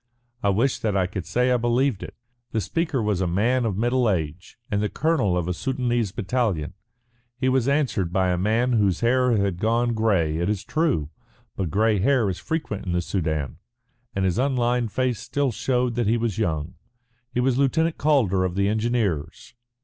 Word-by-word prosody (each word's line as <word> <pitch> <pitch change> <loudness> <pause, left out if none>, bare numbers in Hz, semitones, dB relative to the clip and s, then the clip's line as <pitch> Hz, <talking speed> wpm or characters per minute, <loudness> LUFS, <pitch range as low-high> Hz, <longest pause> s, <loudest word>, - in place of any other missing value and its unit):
"I 100 - +2
wish 115 +7 +1
that 105 -3 0
I 95 - +2
could 95 -1 -5
say 125 +1 +1
I 125 - +4
believed 120 -1 +1
it." - - -8 0.4
The 110 - +1
speaker 160 - -1
was 105 -3 0
a 95 - +1
man 115 +8 +1
of 100 -4 -1
middle 120 +1 +2
age 85 -2 -3
and 100 -1 +1
the 105 - 0
colonel 145 - +1
of 90 -1 -1
a 90 - 0
Soudanese 120 -1 -1
battalion. 100 - -1 0.6
He 130 +1 0
was 130 -1 +1
answered 130 - +1
by 95 0 +1
a 90 - 0
man 115 +6 +1
whose 100 -6 +2
hair 125 0 +3
had 100 -3 0
gone 115 +3 +1
grey, 95 -9 +1
it 85 +3 -1
is 105 -3 -1
true. 140 - 0 0.4
But 95 -4 -2
grey 105 +3 +2
hair 115 -1 +2
is 90 - -6
frequent 150 -11 -3
in 90 - -1
the 90 - +1
Soudan, 80 -6 -2 0.6
and 95 -1 0
his 95 +4 0
unlined 125 -3 +1
face 130 -2 0
still 140 -2 -1
showed 125 +1 0
that 120 -2 0
he 115 +2 +3
was 115 -3 -2
young. 80 -6 -1 0.6
He - - -2
was 130 +1 +2
Lieutenant 160 +4 +1
Calder 120 -12 +2
of 90 -1 -2
the 100 0 +2
Engineers. 110 -6 -1
110 Hz, 190 wpm, -24 LUFS, 95-125 Hz, 0.6 s, I